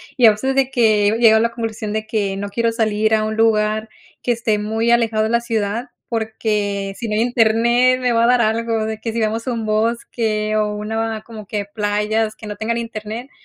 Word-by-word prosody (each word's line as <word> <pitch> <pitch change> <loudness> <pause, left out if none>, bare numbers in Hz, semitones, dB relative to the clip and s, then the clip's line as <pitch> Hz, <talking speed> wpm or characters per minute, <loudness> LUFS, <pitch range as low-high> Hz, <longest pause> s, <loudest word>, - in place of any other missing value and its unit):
y 245 -4 +6
a 220 - +8
veces 265 +6 -2
de 270 -1 +2
que 215 -4 +3
he 220 - 0
llegado 220 -2 +6
a - - +2
la 230 0 +1
conclusión 225 -2 -4
de 220 0 -3
que 200 -3 -1
no 200 0 -4
quiero 230 +2 0
salir 220 -1 +1
a 215 0 0
un 215 0 -3
lugar 215 -1 +1 0.3
que 245 - 0
esté 225 -3 0
muy 220 +2 -1
alejado 225 -2 +2
de 220 - 0
la 235 +1 +2
ciudad, 225 +1 -2 0.2
porque 210 -3 -2
sí 230 - -4
no 210 - -1
hay 220 - +2
internet, 240 +2 +3
me 250 -1 +1
va 230 0 +3
a - - +4
dar 250 0 +4
algo, 225 0 0
de 220 0 -4
que 225 0 -3
sí 230 - -3
vamos 220 +1 -1
a - - 0
un 225 -2 -3
bosque 215 -1 -1
o 210 -1 0
una 220 +1 -3
como 220 -3 -10
que 205 -1 -3
playas 210 +1 -1
que 215 - -10
no 210 - -5
tengan 230 +2 -2
internet, 230 +2 -6
220 Hz, 230 wpm, -19 LUFS, 215-230 Hz, 0.3 s, a